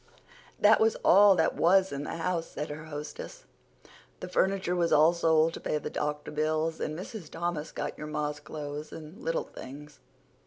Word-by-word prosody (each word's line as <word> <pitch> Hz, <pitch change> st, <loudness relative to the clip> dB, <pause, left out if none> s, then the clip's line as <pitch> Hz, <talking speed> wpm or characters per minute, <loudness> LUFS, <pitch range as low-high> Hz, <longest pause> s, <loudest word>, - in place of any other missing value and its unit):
"That 215 Hz, +1 st, +6 dB
was 220 Hz, 0 st, +3 dB
all 200 Hz, +1 st, +7 dB
that 160 Hz, -3 st, +2 dB
was 190 Hz, +2 st, +4 dB
in 140 Hz, +1 st, -4 dB
the -, -, -4 dB
house," 165 Hz, 0 st, -1 dB
said 150 Hz, -, -5 dB
her 155 Hz, +1 st, -7 dB
hostess. 150 Hz, -, -7 dB, 0.8 s
"The -, -, -6 dB
furniture 190 Hz, 0 st, +1 dB
was 170 Hz, -1 st, +1 dB
all 155 Hz, +3 st, +6 dB
sold 165 Hz, -1 st, +3 dB
to -, -, -6 dB
pay -, -, -1 dB
the 150 Hz, -, -5 dB
doctor 150 Hz, 0 st, -3 dB
bills, 155 Hz, +1 st, 0 dB
and 155 Hz, 0 st, -3 dB
Mrs. 185 Hz, -2 st, -8 dB
Thomas 165 Hz, -2 st, -3 dB
got 145 Hz, -, -5 dB
your 150 Hz, -, -5 dB
ma's 150 Hz, -1 st, -3 dB
clothes 150 Hz, 0 st, -7 dB
and 160 Hz, +2 st, -10 dB
little 165 Hz, 0 st, 0 dB
things. 145 Hz, +3 st, -11 dB
160 Hz, 180 wpm, -29 LUFS, 150-175 Hz, 0.8 s, all